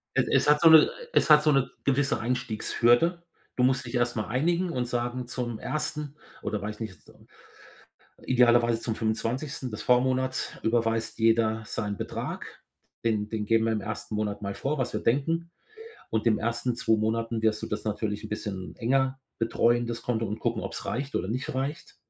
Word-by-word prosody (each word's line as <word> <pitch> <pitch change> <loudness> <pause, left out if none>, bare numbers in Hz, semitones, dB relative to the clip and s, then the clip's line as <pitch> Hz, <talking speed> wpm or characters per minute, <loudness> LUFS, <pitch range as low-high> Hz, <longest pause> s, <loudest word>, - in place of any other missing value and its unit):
Es - - +2
es - - +3
hat 150 +1 +5
so 165 - +8
'ne 160 -1 +8 0.2
es - - +3
hat 150 0 +8
so 155 - +4
'ne 135 -3 +2
gewisse 140 -3 +1
Einstiegshürde. 125 +7 +1 0.3
Du 125 - +1
musst 130 0 +2
dich 120 +1 -5
erst 120 0 +1
mal 110 - -2
einigen 170 - +1
und 125 -6 -2
sagen, 120 +1 -2
zum 120 -2 -4
1. 150 -1 -3 0.3
oder 105 -1 -2
weiß 105 +1 -4
ich - - -21
nicht, 100 -6 -6
z - - -19 1.1
idealerweise 120 -2 +4
zum 115 -1 -3
25. 120 +4 -2
des 105 - -5
Vormonats 130 +1 +1
überweist 115 0 0
jeder 110 -1 +3
seinen 105 -2 -3
Betrag, - - -6 0.4
den 110 -2 0
den 105 -1 -3
geben 115 +1 +3
wir 115 - +1
im 105 - -2
ersten 105 +1 -5
Monat 105 -1 -2
mal 100 -1 -4
vor, 150 +3 -2
was 125 -2 -2
wir - - -2
denken. 165 +7 0 0.6
Und 110 +1 -1
in 115 - +5
den - - -6
ersten 120 +2 -1
2 110 -2 +2
Monaten 115 +1 -1
wirst 110 -1 +1
du - - -2
das 105 0 -4
natürlich 105 -1 -2
'n - - -6
bisschen 100 -3 -5
enger 130 +2 +1 0.2
betreuen, 120 +1 +2
das 115 0 -5
Konto, 115 -2 -1
und 105 +1 -4
gucken, - - -1
ob's - - -6
reicht 135 +3 -3
oder 95 - -2
nicht 125 +5 -3
reicht, 135 +4 -4
120 Hz, 190 wpm, -27 LUFS, 110-130 Hz, 1.1 s, so